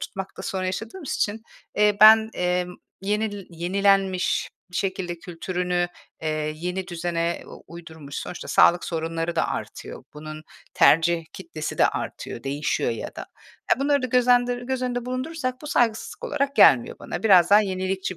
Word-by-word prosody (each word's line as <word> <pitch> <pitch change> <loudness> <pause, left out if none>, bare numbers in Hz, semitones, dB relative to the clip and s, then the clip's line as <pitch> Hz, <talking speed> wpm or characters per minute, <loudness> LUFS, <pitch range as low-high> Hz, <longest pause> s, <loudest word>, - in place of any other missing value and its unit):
tutmakta 195 -2 -7
sorun 190 -3 -3
yaşadığımız 225 - -4
için, 215 +2 -1 0.3
eee, 210 -1 +3
ben, 220 +1 +8
emm, 180 0 -1 0.3
yenil 205 0 -2
yenilenmiş 190 +2 +1 0.2
bir 175 - -6
şekilde 185 -3 -2
kültürünü, 180 +1 -2 0.3
eee, 155 -1 -2
yeni 180 +3 -4
düzene 170 -1 -2
u - - -13
uydurmuş, 160 -4 -11
sonuçta 180 - -6
sağlık 175 0 +4
sorunları 165 0 -3
da - - +1
artıyor, - - -6
bunun 155 +1 -8 0.3
tercih 165 +1 +4
kitlesi 165 -4 -6
de - - +6
artıyor, 115 - -6
değişiyor 145 -1 -1
ya 115 - -4
da. - - -5 0.5
Ya, - - +3
bunları 285 0 +2
da 255 - 0
göz 250 0 +2
endır 245 0 +3
göz 260 0 -3
önünde 245 -1 -2
bulundurursak 255 +1 -3
bu - - -8
saygısızlık 240 - 0
olarak 280 - -1
gelmiyor 120 -3 +5
bana. - - -6
Biraz 185 -5 +6
daha 205 +1 +8
yenilikçi 190 -1 -3
185 Hz, 150 wpm, -24 LUFS, 170-220 Hz, 0.5 s, ben